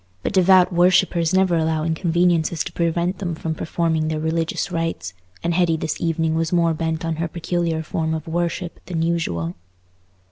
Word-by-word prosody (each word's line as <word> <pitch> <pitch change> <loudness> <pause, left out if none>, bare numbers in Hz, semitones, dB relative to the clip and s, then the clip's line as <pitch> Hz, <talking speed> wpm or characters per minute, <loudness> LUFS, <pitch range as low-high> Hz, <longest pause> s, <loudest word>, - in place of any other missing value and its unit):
But - - -2
devout 185 -1 +5
worshippers 175 -1 +3
never 185 -2 +3
allow 160 -1 0
inconveniences 170 0 +1
to - - -7
prevent 170 +2 0
them 175 -4 -3
from 160 0 -3
performing 160 0 -1
their 155 -1 -1
religious 165 +3 -1
rites, 165 - -3 0.3
and 170 0 0
Hetty 165 -2 +2
this 155 - -3
evening 165 -1 0
was 160 0 0
more 170 -2 +3
bent 160 +1 -2
on 165 -1 -2
her 170 +1 -1
peculiar 170 -1 -2
form 160 0 -2
of 160 +1 -6
worship 175 +1 -2
than 165 -3 -1
usual. 90 - -1
165 Hz, 170 wpm, -22 LUFS, 160-175 Hz, 0.3 s, devout